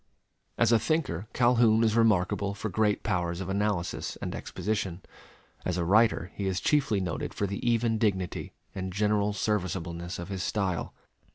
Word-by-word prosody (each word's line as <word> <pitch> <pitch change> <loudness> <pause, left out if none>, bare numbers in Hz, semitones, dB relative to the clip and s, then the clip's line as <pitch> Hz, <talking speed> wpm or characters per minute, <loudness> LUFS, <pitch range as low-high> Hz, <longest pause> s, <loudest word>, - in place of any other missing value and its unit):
As 115 -1 +4
a 115 - +5
thinker 110 - -1
Calhoun 120 -2 +4
is 110 -1 +2
remarkable 100 -2 +2
for 105 +2 -4
great 105 0 +1
powers 90 -4 -1
of 95 -1 -4
analysis 100 -2 -1
and - - -5
exposition. 95 -2 -3 0.6
As 90 -1 -1
a 85 - 0
writer 105 -2 +3
he 100 - -3
is 95 -1 0
chiefly 135 -9 +2
noted 90 -3 -3
for 100 - 0
the 100 0 -4
even 115 -1 +2
dignity 95 -5 -1 0.2
and 95 -1 -4
general 105 +1 +1
serviceableness 90 -4 -2
of 85 +2 -7
his 95 -2 -3
style. 95 -3 -2
100 Hz, 160 wpm, -28 LUFS, 90-110 Hz, 0.6 s, a